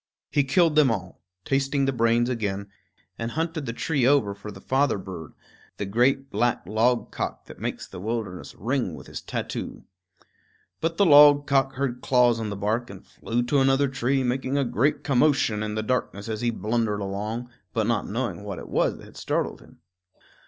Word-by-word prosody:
He 145 Hz, -, +3 dB
killed 165 Hz, +3 st, +3 dB
them 150 Hz, -3 st, +6 dB
all, 95 Hz, -5 st, -4 dB, 0.2 s
tasting 135 Hz, 0 st, +1 dB
the 135 Hz, -, 0 dB
brains 115 Hz, 0 st, +2 dB
again, 100 Hz, -5 st, -2 dB, 0.5 s
and 115 Hz, 0 st, -2 dB
hunted 160 Hz, -3 st, -2 dB
the -, -, -1 dB
tree 140 Hz, +3 st, -1 dB
over 125 Hz, -6 st, +3 dB
for 100 Hz, +1 st, -9 dB
the -, -, -11 dB
father 135 Hz, -2 st, +1 dB
bird, 90 Hz, -5 st, -8 dB, 0.4 s
the 100 Hz, -, -3 dB
great 130 Hz, +7 st, +1 dB
black 120 Hz, -5 st, 0 dB
logcock 115 Hz, +5 st, -1 dB
that -, -, -12 dB
makes -, -, -4 dB
the -, -, -9 dB
wilderness 105 Hz, -3 st, -4 dB
ring 120 Hz, -, -1 dB
with 65 Hz, -, -11 dB
his -, -, -7 dB
tattoo. -, -, -5 dB, 1.0 s
But 165 Hz, +1 st, -1 dB
the 200 Hz, -, +5 dB
logcock 145 Hz, -3 st, +6 dB
heard 130 Hz, -2 st, -2 dB
claws 125 Hz, -3 st, +3 dB
on 110 Hz, -2 st, -3 dB
the 100 Hz, -, -4 dB
bark 110 Hz, +5 st, -1 dB
and 95 Hz, -1 st, -11 dB
flew 120 Hz, +1 st, -2 dB
to 140 Hz, +3 st, +2 dB
another 135 Hz, +1 st, +3 dB
tree, 130 Hz, +1 st, 0 dB
making 130 Hz, +2 st, -1 dB
a 140 Hz, -, +2 dB
great 125 Hz, +5 st, +1 dB
commotion 135 Hz, -5 st, +2 dB
in 105 Hz, 0 st, -3 dB
the 110 Hz, -, -1 dB
darkness 110 Hz, -4 st, -2 dB
as 110 Hz, -1 st, -3 dB
he 120 Hz, -, +1 dB
blundered 110 Hz, -2 st, -1 dB
along, 105 Hz, +5 st, -4 dB, 0.2 s
but 110 Hz, -3 st, 0 dB
not 115 Hz, -2 st, 0 dB
knowing 115 Hz, -1 st, -3 dB
what 100 Hz, -3 st, -5 dB
it -, -, -9 dB
was -, -, +1 dB
that -, -, -13 dB
had -, -, -15 dB
startled -, -, -2 dB
him. -, -, -19 dB
120 Hz, 185 wpm, -25 LUFS, 105-135 Hz, 1.0 s, them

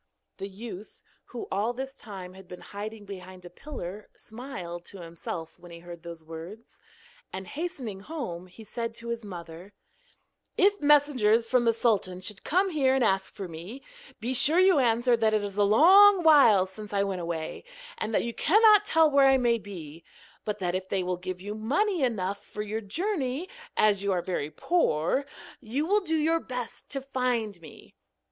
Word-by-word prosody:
The 195 Hz, -, -5 dB
youth, 210 Hz, 0 st, -10 dB, 0.2 s
who 245 Hz, -, -7 dB
all 210 Hz, +5 st, 0 dB
this 265 Hz, +2 st, -6 dB
time 190 Hz, -6 st, -9 dB
had 190 Hz, 0 st, -14 dB
been 180 Hz, 0 st, -10 dB
hiding 210 Hz, +1 st, -7 dB
behind 185 Hz, -2 st, -10 dB
a 175 Hz, -, -10 dB
pillar, 210 Hz, -5 st, -8 dB
smiled 205 Hz, -8 st, -7 dB
to 195 Hz, -, -9 dB
himself 165 Hz, -1 st, -7 dB
when 175 Hz, -, -13 dB
he 170 Hz, -, -10 dB
heard 170 Hz, 0 st, -10 dB
these 170 Hz, -2 st, -9 dB
words, 165 Hz, +8 st, -10 dB, 0.5 s
and, 190 Hz, 0 st, -6 dB
hastening 270 Hz, -, -5 dB
home, 195 Hz, -, -6 dB
he 185 Hz, +5 st, -13 dB
said 230 Hz, +2 st, -5 dB
to 235 Hz, 0 st, -8 dB
his 235 Hz, -1 st, -3 dB
mother: 175 Hz, 0 st, -9 dB, 0.8 s
'If 405 Hz, +1 st, +3 dB
messengers 275 Hz, -7 st, +4 dB
from 250 Hz, 0 st, +2 dB
the 230 Hz, -, +5 dB
sultan 210 Hz, -6 st, 0 dB
should 195 Hz, +1 st, -5 dB
come 375 Hz, +4 st, +2 dB
here 270 Hz, -4 st, +2 dB
and 265 Hz, -, +2 dB
ask 190 Hz, -3 st, +1 dB
for 195 Hz, -, -5 dB
me, 175 Hz, +11 st, -9 dB, 0.4 s
be 245 Hz, +4 st, -2 dB
sure 275 Hz, +6 st, +4 dB
you 370 Hz, -4 st, +5 dB
answer 240 Hz, 0 st, +3 dB
that 220 Hz, -2 st, +2 dB
it 210 Hz, -, +1 dB
is 205 Hz, 0 st, -4 dB
a -, -, +5 dB
long 370 Hz, -, +7 dB
while 275 Hz, -, +7 dB
since 205 Hz, +2 st, -10 dB
I 200 Hz, 0 st, +2 dB
went 195 Hz, -2 st, -3 dB
away, 165 Hz, -2 st, -4 dB, 0.4 s
and 220 Hz, -, -2 dB
that -, -, +2 dB
you 235 Hz, -, -3 dB
cannot 420 Hz, -, +5 dB
tell 320 Hz, -1 st, +4 dB
where 280 Hz, -1 st, +6 dB
I 270 Hz, 0 st, +6 dB
may 240 Hz, -2 st, +2 dB
be, 165 Hz, -6 st, -10 dB, 0.4 s
but 210 Hz, -1 st, -2 dB
that 180 Hz, -3 st, -2 dB
if 185 Hz, 0 st, -3 dB
they 190 Hz, -2 st, 0 dB
will 180 Hz, 0 st, -2 dB
give 180 Hz, 0 st, -6 dB
you 205 Hz, +2 st, -5 dB
money 295 Hz, -, 0 dB
enough 200 Hz, -6 st, -1 dB
for 210 Hz, -, -6 dB
your 215 Hz, +1 st, -3 dB
journey, 295 Hz, -, -2 dB, 0.3 s
as 205 Hz, -2 st, +3 dB
you 200 Hz, 0 st, 0 dB
are 175 Hz, -2 st, -1 dB
very 175 Hz, -5 st, -2 dB
poor, 220 Hz, -, +1 dB, 0.3 s
you 260 Hz, +6 st, -2 dB
will 410 Hz, +4 st, +3 dB
do 325 Hz, -4 st, -1 dB
your 325 Hz, +2 st, +2 dB
best 250 Hz, -5 st, -7 dB
to 275 Hz, -, -2 dB
find 245 Hz, -8 st, -2 dB
me.' 155 Hz, -3 st, -14 dB
215 Hz, 185 wpm, -28 LUFS, 185-270 Hz, 0.8 s, long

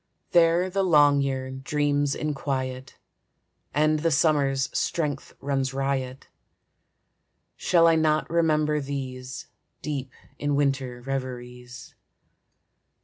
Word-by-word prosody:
There 170 Hz, +1 st, +4 dB
the 195 Hz, +1 st, -1 dB
long 145 Hz, -6 st, +5 dB
year 130 Hz, -1 st, -2 dB
dreams 145 Hz, +1 st, 0 dB
in 150 Hz, -1 st, -2 dB
quiet, 130 Hz, -2 st, -4 dB, 0.7 s
And 155 Hz, +1 st, +2 dB
the 165 Hz, +2 st, +1 dB
summer's 140 Hz, -3 st, +1 dB
strength 145 Hz, -5 st, -2 dB
runs 135 Hz, -1 st, -1 dB
riot. 135 Hz, -1 st, -2 dB, 1.3 s
Shall 170 Hz, -2 st, +3 dB
I 165 Hz, -1 st, +5 dB
not 155 Hz, -1 st, +2 dB
remember 155 Hz, -2 st, +1 dB
these, 130 Hz, -2 st, -6 dB, 0.4 s
Deep 140 Hz, -4 st, -3 dB, 0.3 s
in 145 Hz, 0 st, 0 dB
winter 135 Hz, -3 st, -1 dB
reveries? 125 Hz, -2 st, -6 dB
140 Hz, 100 wpm, -25 LUFS, 130-155 Hz, 1.3 s, long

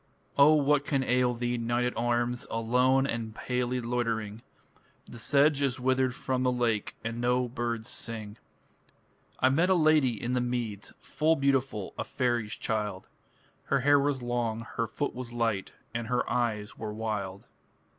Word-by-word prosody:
O 145 Hz, +2 st, +7 dB
what 145 Hz, -1 st, +3 dB
can 135 Hz, -2 st, 0 dB
ail 125 Hz, -1 st, +2 dB
thee, 120 Hz, 0 st, -1 dB
knight 120 Hz, +1 st, 0 dB
at 125 Hz, -, -2 dB
arms, 120 Hz, +1 st, 0 dB
Alone 125 Hz, +4 st, +2 dB
and 115 Hz, -4 st, -3 dB
palely 125 Hz, +1 st, -1 dB
loitering? 115 Hz, -3 st, -2 dB, 0.6 s
The 120 Hz, -, -10 dB
sedge 145 Hz, +3 st, +3 dB
is 130 Hz, -2 st, 0 dB
withered 130 Hz, 0 st, +1 dB
from 130 Hz, -2 st, -2 dB
the 130 Hz, 0 st, +2 dB
lake 115 Hz, -4 st, 0 dB
And 115 Hz, +1 st, -3 dB
no 125 Hz, +1 st, +2 dB
birds 120 Hz, -1 st, -3 dB
sing. 110 Hz, -3 st, -4 dB, 1.0 s
I 130 Hz, -, +5 dB
met 165 Hz, +7 st, +2 dB
a 190 Hz, -, +5 dB
lady 155 Hz, -, +3 dB
in 120 Hz, +4 st, -2 dB
the 125 Hz, -, +1 dB
meads, 120 Hz, -4 st, -3 dB
Full 160 Hz, +2 st, +1 dB
beautiful 135 Hz, -8 st, 0 dB
a -, -, 0 dB
faery's 120 Hz, -4 st, -1 dB
child; 105 Hz, -4 st, -3 dB, 0.6 s
Her 140 Hz, -, +1 dB
hair 145 Hz, +2 st, +5 dB
was 140 Hz, -2 st, 0 dB
long, 120 Hz, -2 st, -1 dB
her 115 Hz, -, 0 dB
foot 145 Hz, -, -3 dB
was 125 Hz, -1 st, -7 dB
light, 115 Hz, -5 st, -1 dB, 0.2 s
And 115 Hz, -1 st, -3 dB
her 125 Hz, +1 st, 0 dB
eyes 110 Hz, -4 st, -1 dB
were 105 Hz, -1 st, -5 dB
wild. 105 Hz, -3 st, -4 dB
120 Hz, 160 wpm, -29 LUFS, 115-130 Hz, 1.0 s, O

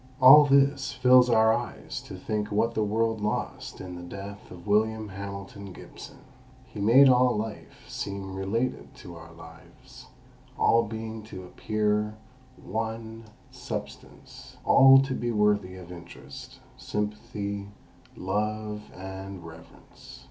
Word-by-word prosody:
All 140 Hz, +3 st, +9 dB
this 140 Hz, 0 st, +2 dB
fills 125 Hz, -1 st, +5 dB
our 110 Hz, -1 st, +5 dB
eyes -, -, -5 dB
to -, -, -8 dB
think 105 Hz, -1 st, -3 dB
what 115 Hz, +3 st, +1 dB
the 110 Hz, -, 0 dB
world 110 Hz, +1 st, 0 dB
lost 105 Hz, +1 st, -4 dB
in 90 Hz, -1 st, -8 dB
the 90 Hz, -, -8 dB
death 100 Hz, +3 st, -9 dB
of 85 Hz, -1 st, -12 dB
William 110 Hz, +1 st, +1 dB
Hamilton 100 Hz, +1 st, -8 dB
Gibson. -, -, -12 dB, 0.5 s
He 110 Hz, -, -11 dB
made 120 Hz, +7 st, +6 dB
all 125 Hz, -2 st, +4 dB
life 110 Hz, 0 st, -7 dB
seem 100 Hz, -1 st, -6 dB
related 115 Hz, +8 st, -3 dB
to 105 Hz, -10 st, -11 dB
our 85 Hz, 0 st, -12 dB
lives, 80 Hz, 0 st, -15 dB, 0.5 s
all 115 Hz, -, +4 dB
being 110 Hz, +1 st, -6 dB
to 95 Hz, -4 st, -9 dB
appear 105 Hz, +2 st, -1 dB, 0.5 s
one 110 Hz, +2 st, -5 dB, 0.3 s
substance, -, -, -9 dB
all 135 Hz, 0 st, +8 dB
to 135 Hz, -1 st, -3 dB
be 120 Hz, -2 st, -2 dB
worthy 105 Hz, -3 st, +1 dB
of 90 Hz, -1 st, -11 dB
interest, 85 Hz, -6 st, -11 dB, 0.2 s
sympathy, 105 Hz, -1 st, -4 dB, 0.5 s
love, 105 Hz, +2 st, -3 dB, 0.2 s
and 95 Hz, -1 st, -8 dB
reverence. 80 Hz, 0 st, -14 dB
105 Hz, 125 wpm, -27 LUFS, 95-115 Hz, 0.5 s, All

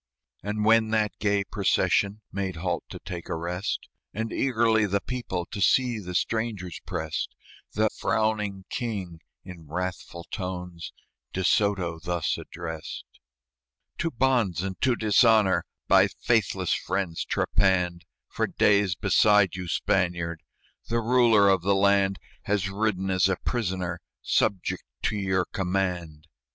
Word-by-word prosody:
And 105 Hz, +1 st, -2 dB
when 110 Hz, 0 st, +5 dB
that 110 Hz, -1 st, +1 dB
gay 100 Hz, -1 st, +1 dB
procession 100 Hz, +1 st, +1 dB
Made 95 Hz, -2 st, -3 dB
halt 85 Hz, +1 st, -2 dB
to -, -, -7 dB
take 90 Hz, -2 st, -6 dB
a -, -, -1 dB
rest, 90 Hz, +4 st, -3 dB, 0.3 s
And 110 Hz, +1 st, -3 dB
eagerly 115 Hz, -4 st, +2 dB
the 100 Hz, +1 st, +1 dB
people 105 Hz, -7 st, -4 dB
To 100 Hz, -, -5 dB
see 125 Hz, +1 st, +3 dB
the 90 Hz, -3 st, -7 dB
strangers 105 Hz, -5 st, -2 dB
prest, 80 Hz, 0 st, -3 dB, 0.4 s
The 110 Hz, 0 st, +2 dB
frowning 105 Hz, -3 st, -1 dB
King, 95 Hz, -9 st, -4 dB, 0.2 s
in 85 Hz, -4 st, -11 dB
wrathful 90 Hz, +1 st, -4 dB
tones, 90 Hz, -3 st, -5 dB, 0.4 s
De 95 Hz, -, -2 dB
Soto 95 Hz, -4 st, +1 dB
thus 85 Hz, -1 st, -1 dB
addressed: 80 Hz, -2 st, -7 dB, 0.9 s
"To 165 Hz, -, 0 dB
bonds 120 Hz, -, +1 dB
and 95 Hz, -1 st, -5 dB
to 125 Hz, -1 st, +3 dB
dishonor 110 Hz, -2 st, +4 dB, 0.2 s
By -, -, +6 dB
faithless -, -, 0 dB
friends 95 Hz, -3 st, -2 dB
trepanned, 90 Hz, -3 st, +1 dB, 0.3 s
For -, -, -1 dB
days 100 Hz, -3 st, +3 dB
beside 105 Hz, -1 st, +4 dB
you, 90 Hz, -1 st, -5 dB
Spaniard, 85 Hz, -1 st, 0 dB, 0.5 s
The 115 Hz, 0 st, +1 dB
ruler 115 Hz, -3 st, +4 dB
of 95 Hz, -2 st, +4 dB
the 100 Hz, +2 st, +2 dB
land 100 Hz, -1 st, +3 dB, 0.3 s
Has 100 Hz, -2 st, 0 dB
ridden 95 Hz, -2 st, -1 dB
as 95 Hz, +1 st, +3 dB
a 95 Hz, -, +2 dB
prisoner, 90 Hz, -6 st, -2 dB, 0.2 s
Subject 95 Hz, -3 st, 0 dB, 0.2 s
to 110 Hz, -, 0 dB
your 95 Hz, -2 st, 0 dB
command. 90 Hz, -5 st, -2 dB
95 Hz, 130 wpm, -26 LUFS, 90-110 Hz, 0.9 s, By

